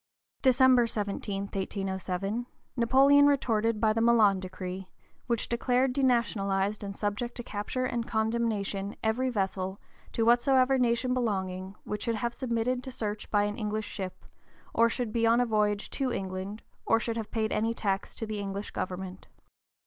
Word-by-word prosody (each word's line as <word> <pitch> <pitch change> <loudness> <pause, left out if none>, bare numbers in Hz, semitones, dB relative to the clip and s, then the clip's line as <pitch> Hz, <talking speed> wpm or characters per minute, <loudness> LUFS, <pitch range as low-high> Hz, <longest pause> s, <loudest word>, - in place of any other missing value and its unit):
December 255 -2 +5
17, 200 -2 -3
1807, 195 +2 -3 0.3
Napoleon 275 +4 +6
retorted 230 -6 +2
by 215 -1 +3
the 225 - 0
Milan 220 -4 +5
decree, 185 0 -6 0.4
which 235 -3 0
declared 250 +2 +1
denationalized 210 -6 +1
and 200 -1 -6
subject 210 +3 -2
to 240 - -5
capture 230 +4 -3
and 235 -2 -2
condemnation 220 -3 -1
every 235 +4 +1
vessel, 190 -3 -2 0.3
to 225 - 0
whatsoever 255 +2 +4
nation 245 +1 +2
belonging, 190 -5 -2
which 210 0 -4
should 230 - 0
have 235 +2 -2
submitted 245 0 -1
to 260 - -6
search 210 -3 -4
by 205 -1 +3
an 205 +2 -2
English 215 0 -2
ship, 190 -3 -6 0.5
or 230 0 +4
should 230 -2 -3
be 230 -1 +2
on 230 +1 +5
a 245 - +3
voyage 210 -2 +1
to 270 -2 -1
England, 190 +1 -4 0.2
or 225 - +3
should 230 +1 -3
have 225 -2 -4
paid 220 -1 -1
any 225 +2 +1
tax 195 -3 -2
to 225 - -4
the 215 -1 -4
English 200 0 -4
government. 185 0 -5
220 Hz, 155 wpm, -29 LUFS, 200-240 Hz, 0.5 s, Napoleon